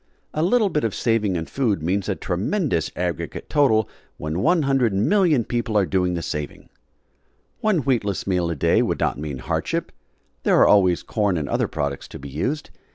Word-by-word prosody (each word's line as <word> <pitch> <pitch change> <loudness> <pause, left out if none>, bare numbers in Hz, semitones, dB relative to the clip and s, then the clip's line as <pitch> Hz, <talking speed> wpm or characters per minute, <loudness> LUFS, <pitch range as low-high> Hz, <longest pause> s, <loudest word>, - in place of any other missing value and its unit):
A 155 - -1
little 210 +4 +3
bit 150 -4 -1
of 110 -3 -1
saving 115 -5 +1
in 80 -1 -2
food 110 - -1
means 95 +4 -1
a 100 - 0
tremendous 90 - -1
aggregate 90 -3 -4
total, 110 -8 +3 0.3
when 75 0 -4
100,000,000 135 - +2
people 120 -3 -1
are 100 - +4
doing 90 -1 0
the 85 - -3
saving. 75 -1 -5 0.9
One 210 -7 +2
wheatless 110 -7 0
meal 90 -3 0
a 85 - -2
day 70 - +3
would - - -1
not - - 0
mean 75 -3 -4
hardship; 65 - -2 0.5
there - - +3
are - - +6
always 95 -4 +4
corn 100 -5 0
and 75 -3 -2
other - - 0
products 70 -2 -3
to - - -9
be 70 - -9
used. 130 - -3
100 Hz, 175 wpm, -23 LUFS, 85-135 Hz, 0.9 s, are